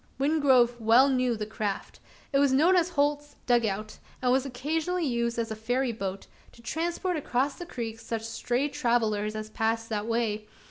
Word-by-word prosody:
Wingrove 265 -4 +3
well 235 +5 +6
knew 255 -2 +1
the 210 - -3
craft. 210 -2 -4 0.3
It 275 - +4
was 280 -1 +4
known 320 +8 +5
as 350 -1 +3
Holt's 290 -2 0
"dug 240 -2 +3
out;" 215 +2 -4 0.2
and 250 -1 +1
was 265 +1 +2
occasionally 320 +7 -1
used 235 -3 -1
as 230 -1 -2
a - - -2
ferry 245 +4 0
boat, 195 -3 -5 0.3
to 235 - -16
transport 340 +6 -2
across 275 -1 0
the 350 - -9
creek 225 -6 -5
such 225 0 -4
stray 240 +4 -1
travellers 230 -7 0
as 215 0 -6
passed 225 +1 -1
that 215 -1 -2
way. 220 -2 -1
245 Hz, 180 wpm, -28 LUFS, 225-285 Hz, 0.3 s, well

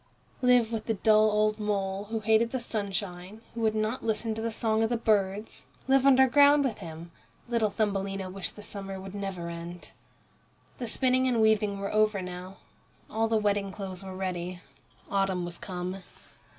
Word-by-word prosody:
Live 245 -3 +4
with 225 -2 -3
the 225 - +1
dull 215 +1 +5
old 215 0 +2
mole, 200 -1 -1
who 220 +1 -3
hated 220 +2 +3
the 260 - -2
sunshine, 200 -2 -4
who 230 - -5
would 220 -1 +2
not 215 +3 -1
listen 220 0 -1
to 220 - -4
the 230 - -1
song 220 -1 0
of 225 - +2
the 240 - +1
birds 210 -1 0 0.3
live 270 0 +4
underground 285 +2 +6
with 245 -6 -2
him! 165 +1 -9 0.4
Little 230 -3 +1
Thumbelina 195 -2 -1
wished 190 0 -6
the 210 - -10
summer 195 -2 -6
would 190 0 -8
never 195 -4 -4
end. 170 +1 -8 0.9
The 245 - -3
spinning 255 +2 +2
and 245 -3 +2
weaving 215 -2 +3
were 200 +1 -4
over 215 -1 +3
now. 180 +1 -7 0.5
All 225 +1 +1
the 225 0 +2
wedding 205 -2 0
clothes 190 -1 -7
were 190 -1 -7
ready. 180 -1 -3 0.5
Autumn 195 -3 +1
was 175 0 -6
come. 180 0 -4
210 Hz, 175 wpm, -28 LUFS, 190-225 Hz, 0.9 s, underground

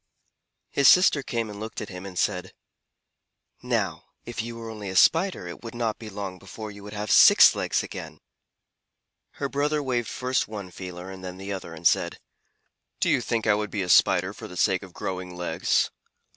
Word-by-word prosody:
His 140 - +4
sister 180 -5 +6
came 115 -4 -2
and 105 -1 -8
looked 110 +1 -6
at 105 - -6
him 90 0 -8
and 90 -2 -9
said, - - -1 1.1
"Now - - -1 0.2
if 120 -1 -4
you 115 +1 -6
were 115 -1 -7
only 105 -3 -7
a 95 - -5
Spider 165 - +3
it 85 - -8
would 115 0 -8
not 115 -2 -2
be 110 - -8
long 95 -2 -6
before 105 +3 -8
you 100 0 -12
would 105 +1 -9
have 105 0 -3
six - - +8
legs - - -1
again." - - -8 1.2
Her 140 - -3
brother 145 +2 0
waved 120 -4 -1
first 125 0 -1
one 100 -4 -7
feeler 90 +1 -8
and 95 -1 -10
then 90 0 -7
the 100 +1 -5
other, 90 -3 -7
and 80 +1 -12
said: - - +3 0.8
"Do - - +2
you - - +3
think 115 -2 -1
I 110 - +5
would 105 0 -1
be 100 -3 -2
a 90 - -5
Spider 95 +1 +4
for 110 - -9
the 90 - -10
sake 95 -1 +2
of 95 -2 -11
growing 90 0 -5
legs? 90 0 0
105 Hz, 200 wpm, -26 LUFS, 95-115 Hz, 1.2 s, six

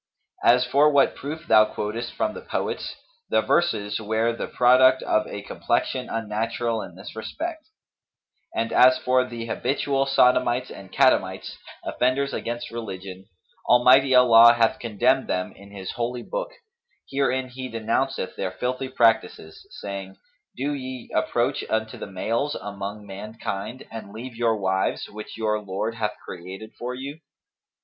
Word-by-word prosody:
As 125 +1 +5
for 140 +4 +4
what 140 -2 +3
proof 155 +3 -6
thou 110 -1 +7
quotest 110 +3 -4
from - - -1
the - - -8
poets, - - -3 0.3
the - - +3
verses 105 -12 +1
were 110 +2 0
the 115 - -4
product 130 +1 +5
of 110 - +1
a 100 - -6
complexion 125 +4 -1
unnatural 115 +1 -2
in 90 -3 -9
this 95 +3 -10
respect; 315 - -5 0.9
and 115 0 -1
as 130 0 +7
for 130 0 +2
the 120 -2 -6
habitual 135 +3 0
sodomites 125 -1 +3
and 95 -1 -11
catamites, 95 -9 +2 0.3
offenders 135 +3 0
against 120 +1 -4
religion, 95 -4 -7 0.4
Almighty 130 +2 +6
Allah 120 -2 +8
hath 120 +2 +2
condemned 120 +4 +1
them 90 0 -2
in 100 +1 -14
His 100 -2 -6
Holy 120 +1 -3
Book,[FN#243] - - -4 0.6
herein 130 -2 +1
He 130 +1 -7
denounceth 115 0 -1
their 95 -1 -3
filthy 130 +6 -3
practices, 110 -10 +1 0.2
saying, 95 -1 -6 0.4
'Do 140 +3 -1
ye 130 -3 -7
approach - - 0
unto 110 0 -2
the - - -6
males 115 +9 -1
among 100 +1 -6
mankind[FN#244] 100 +3 -6
and 110 -3 -8
leave 120 +3 -8
your 115 -1 +1
wives 95 -1 0
which 105 +1 -9
your 105 -1 0
Lord 105 +2 -3
hath 110 -2 -2
created 95 +5 -9
for 125 +1 -4
you? 140 +4 -7
115 Hz, 145 wpm, -24 LUFS, 105-130 Hz, 0.9 s, Allah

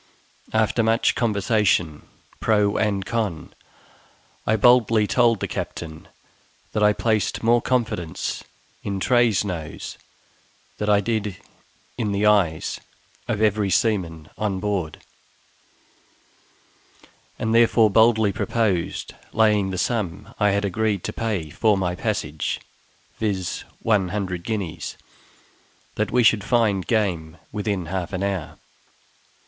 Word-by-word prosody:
After 110 +1 +2
much 115 +1 +2
conversation 100 -8 +1 0.3
pro 105 -2 +2
and 100 -3 0
con, 105 -9 -3 0.9
I 110 - +3
boldly 115 -1 +5
told 115 0 +3
the - - -2
captain 80 -1 -6 0.6
that 105 - -1
I 105 0 +6
placed 110 0 0
more 120 +1 +4
confidence 110 -10 -2 0.4
in 100 -1 -3
Tray's 120 -2 +3
nose 85 -6 -6 0.8
than 105 - -1
I 100 -1 +4
did 105 -2 -2 0.6
in 105 -3 0
the 100 +1 +1
eyes 95 -7 +2 0.5
of 105 - 0
every 105 -1 +2
seaman 85 -8 0
on 100 -3 -1
board; 95 -6 -3 2.3
and 110 0 -1
therefore 115 -2 +5
boldly 110 -1 +4
proposed 105 -7 -1 0.2
laying 105 -3 +3
the 95 - -3
sum 100 -1 -2
I 105 -1 +4
had 100 +1 +1
agreed 100 0 0
to - - -4
pay 100 -9 -2
for 105 +2 +2
my 90 -2 -1
passage 100 -6 -2 0.6
(viz., 95 -5 -2 0.2
one 105 -4 +2
hundred 90 -3 -3
guineas) 100 -7 -4 1.0
that 105 - -1
we 125 - +3
should 110 -3 +4
find 110 -6 +1
game 90 -8 0
within 100 -4 -2
half 90 +2 -4
an 95 +1 -2
hour. 95 -5 -3
105 Hz, 120 wpm, -23 LUFS, 95-110 Hz, 2.3 s, I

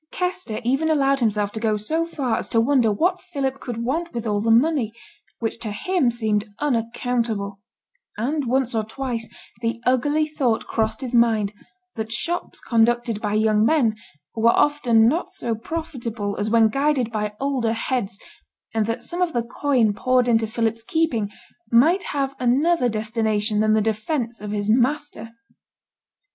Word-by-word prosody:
Kester 360 -11 -3
even 270 +7 +1
allowed 275 -3 +3
himself 210 -3 +1
to 220 - -5
go 215 -1 +1
so 315 +11 -1
far 275 -8 -1
as - - -6
to 230 - +2
wonder 240 -2 +3
what 355 - +1
Philip 275 -7 -3
could 240 -4 -5
want 325 +6 -2
with 235 -1 -3
all 205 -2 0
the 225 - 0
money, 240 -1 +3 0.4
which 230 0 -3
to 230 - -4
him 335 - +1
seemed 215 -3 -1
unaccountable; 230 -5 -1 0.6
and 275 +5 -1
once 255 0 +1
or 220 -1 0
twice 230 0 -4 0.3
the 230 0 -1
ugly 290 +5 +2
thought 265 -7 0
crossed 220 +3 -1
his 255 -2 -5
mind, 220 -4 +3 0.4
that 220 0 -5
shops 345 +9 -2
conducted 235 -1 +1
by 210 -1 -1
young 215 0 +3
men 230 -4 +3 0.4
were 230 +1 +4
often 235 -5 +4
not 320 +8 0
so 235 - -2
profitable 235 -6 -4
as 205 +1 -1
when 225 0 +5
guided 275 -2 +1
by 210 -2 -2
older 265 -5 0
heads, 225 -4 -2 0.5
and 220 -1 +1
that 230 - -3
some 350 +1 -3
of 355 -2 +1
the 235 - 0
coin 240 -2 +1
poured 250 +3 +2
into 225 -2 +3
Philip's 225 0 -1
keeping 235 -7 0 0.4
might 315 +11 +5
have 275 -1 -2
another 255 +3 +2
destination 215 -1 0
than 215 0 +3
the 220 - +3
defence 225 +3 -2
of 210 - -5
his 205 0 -2
master. 250 0 +1
235 Hz, 160 wpm, -23 LUFS, 220-275 Hz, 0.6 s, when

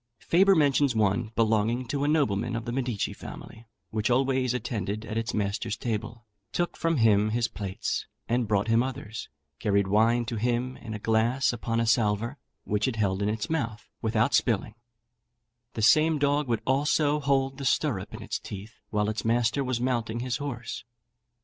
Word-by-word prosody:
Faber 195 +3 +4
mentions 140 -4 +3
one 105 +1 +1
belonging 115 +2 +2
to 140 +3 -2
a - - +1
nobleman 125 -7 +1
of 115 - -4
the 120 - -3
Medici 120 -4 -2
family, 115 0 -10 0.2
which 110 +1 0
always 130 0 +2
attended 110 -4 -3
at 110 - -5
its 115 +1 -1
master's 100 0 -2
table, 115 0 -4 0.3
took 175 0 -1
from 165 -1 0
him 105 -3 +4
his 115 +1 +1
plates, 100 -3 -3 0.2
and 120 -1 +1
brought 105 +1 +1
him 115 +1 +4
others; 120 -4 -5 0.3
carried 100 -2 +2
wine 115 +4 +3
to 115 -1 -3
him 120 +3 0
in 110 -2 -7
a - - -3
glass 115 +5 +2
upon 115 0 -2
a 115 - +2
salver, 115 +3 +1 0.2
which 105 +4 0
it 130 - -1
held 100 -3 0
in 100 - +1
its 105 -1 -2
mouth, 115 -9 -3
without 115 +3 +1
spilling; 110 -3 +1 1.0
the 110 - -2
same 155 +6 +5
dog 145 0 +1
would 115 -3 -1
also 145 +2 +2
hold 135 -1 0
the - - -5
stirrup 130 - 0
in - - -8
its - - -3
teeth 105 +3 -9
while 105 -1 0
its 110 0 -2
master 115 +3 +2
was 130 -2 -1
mounting 120 -2 -1
his 125 -1 -1
horse. 130 -7 -5
115 Hz, 175 wpm, -27 LUFS, 110-130 Hz, 1.0 s, same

